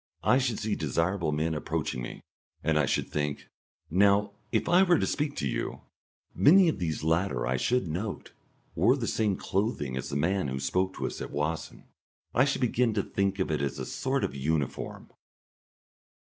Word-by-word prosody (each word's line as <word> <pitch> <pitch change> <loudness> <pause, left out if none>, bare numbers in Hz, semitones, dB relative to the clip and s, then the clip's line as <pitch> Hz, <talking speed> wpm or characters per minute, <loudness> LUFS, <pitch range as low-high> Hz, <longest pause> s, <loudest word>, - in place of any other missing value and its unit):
I 125 - +4
should 120 -5 0
see 110 -1 -2
desirable 85 +3 0
men 80 +2 0
approaching 70 -4 -2
me, - - -7 0.4
and 75 +1 +2
I 70 - +2
should - - 0
think; 75 -1 -3 0.4
"Now, 100 +3 +4 0.2
if - - +1
I 175 +2 +5
were 180 -3 +5
to - - +1
speak 150 -1 -1
to 70 - -1
you?" - - -3 0.5
Many 180 +4 +6
of 155 - -2
these 80 -4 -2
latter 80 -6 +1
I 65 +1 0
should 125 - +1
note 95 +7 -4 0.4
wore 115 - +3
the 120 - -2
same 105 -4 0
clothing 95 - -1
as 65 - -4
the - - -4
man 90 +4 +1
who 65 0 -3
spoke 90 +8 0
to - - -3
us - - -4
at - - -4
Wassen; 75 +3 -3 0.5
I 130 - +4
should 140 -2 -1
begin 120 -2 +2
to 100 - +1
think 100 0 -1
of 95 -4 -1
it 75 - 0
as 70 -2 -2
a - - -4
sort - - -1
of - - -1
uniform.... 70 0 -3
90 Hz, 190 wpm, -28 LUFS, 75-110 Hz, 0.5 s, Many